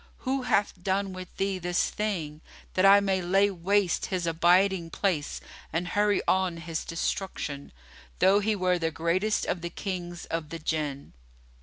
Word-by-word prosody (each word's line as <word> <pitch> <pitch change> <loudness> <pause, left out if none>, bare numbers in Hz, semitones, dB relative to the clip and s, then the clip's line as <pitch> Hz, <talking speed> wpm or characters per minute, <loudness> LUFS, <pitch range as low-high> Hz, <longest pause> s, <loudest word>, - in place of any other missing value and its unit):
Who 265 +1 0
hath 205 -6 0
done 195 +1 -1
with 185 -1 -9
thee 195 -1 -1
this 175 0 0
thing, 165 -8 -3 0.3
that 185 +1 +4
I 200 +1 +8
may 190 -2 +1
lay 195 +3 +3
waste 190 0 +1
his 185 -3 -2
abiding 175 +2 +3
place 165 -6 -1 0.3
and 175 +2 -2
hurry 205 +1 +2
on 185 -2 +2
his 165 -1 -4
destruction, 165 -4 -3 0.5
though 190 +2 +5
he 215 +1 +1
were 180 -2 +1
the 165 -1 0
greatest 170 +6 0
of 175 - -2
the 170 - -4
Kings 175 -2 -5
of 165 -2 -4
the 165 - -5
Jann?" 150 -3 -3
180 Hz, 160 wpm, -28 LUFS, 165-195 Hz, 0.5 s, I